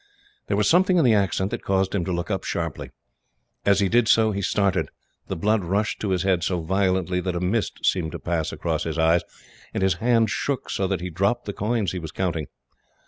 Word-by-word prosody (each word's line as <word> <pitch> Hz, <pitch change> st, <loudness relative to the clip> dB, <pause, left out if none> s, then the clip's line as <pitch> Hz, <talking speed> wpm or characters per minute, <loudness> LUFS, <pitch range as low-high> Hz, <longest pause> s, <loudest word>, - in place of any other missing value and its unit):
There -, -, 0 dB
was -, -, +2 dB
something 185 Hz, +1 st, +4 dB
in 165 Hz, -, +4 dB
the 120 Hz, -, +5 dB
accent 100 Hz, -1 st, +1 dB
that -, -, -3 dB
caused 95 Hz, -1 st, 0 dB
him 100 Hz, -4 st, 0 dB
to 95 Hz, -, -2 dB
look 85 Hz, +3 st, -2 dB
up 95 Hz, -, -1 dB
sharply. -, -, -3 dB, 0.8 s
As 100 Hz, 0 st, +4 dB
he 100 Hz, -, +3 dB
did 120 Hz, +3 st, +3 dB
so, 110 Hz, 0 st, +4 dB
he 100 Hz, -1 st, -2 dB
started. 100 Hz, -1 st, +1 dB, 0.4 s
The -, -, -3 dB
blood 105 Hz, +4 st, +1 dB
rushed 100 Hz, +5 st, -1 dB
to 105 Hz, -, -2 dB
his 90 Hz, -1 st, 0 dB
head 95 Hz, -3 st, +1 dB
so 90 Hz, -1 st, -1 dB
violently 95 Hz, 0 st, 0 dB
that 90 Hz, -1 st, -2 dB
a -, -, -1 dB
mist 100 Hz, +5 st, -1 dB
seemed 80 Hz, -5 st, +1 dB
to -, -, -5 dB
pass 80 Hz, -2 st, -2 dB
across -, -, -2 dB
his -, -, -3 dB
eyes, 80 Hz, +1 st, +4 dB, 0.5 s
and -, -, 0 dB
his 95 Hz, 0 st, +3 dB
hand 115 Hz, -2 st, +3 dB
shook 140 Hz, -3 st, -2 dB
so 95 Hz, -, 0 dB
that 95 Hz, -2 st, -2 dB
he 90 Hz, 0 st, -4 dB
dropped 120 Hz, +9 st, 0 dB
the 100 Hz, -, -4 dB
coins 105 Hz, 0 st, -1 dB
he 90 Hz, -, -4 dB
was 80 Hz, -2 st, -7 dB
counting. 85 Hz, -6 st, -2 dB
95 Hz, 225 wpm, -24 LUFS, 90-105 Hz, 0.8 s, the